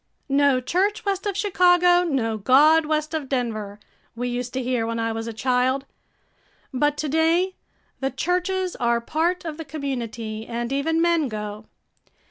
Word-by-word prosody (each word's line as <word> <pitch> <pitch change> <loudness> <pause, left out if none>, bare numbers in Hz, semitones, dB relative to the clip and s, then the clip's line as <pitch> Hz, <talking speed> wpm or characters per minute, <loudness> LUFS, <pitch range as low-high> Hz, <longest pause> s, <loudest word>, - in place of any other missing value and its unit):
"No 280 -1 +3
church 385 - 0
west 395 0 -1
of 400 -2 -2
Chicago, 355 -3 +4
no 255 -9 0
God 295 +9 +5
west 305 0 -1
of 300 -4 -3
Denver," 215 -6 -3 0.4
we 245 +1 -2
used 245 0 -3
to 260 0 -2
hear 245 -2 -1
when 230 0 -2
I 225 0 -1
was 225 0 -4
a - - -3
child. 255 +3 0 0.9
But 295 +3 +1
to 305 - -2
day, 325 +5 +2 0.5
the 270 - 0
churches 360 +6 -1
are 235 -1 +1
part 330 +9 -1
of 310 -2 -5
the 325 - -5
community 235 -7 -5
and 235 +2 -3
even 320 +4 +1
men 340 -4 +2
go. 210 -1 -6
275 Hz, 160 wpm, -23 LUFS, 235-330 Hz, 0.9 s, God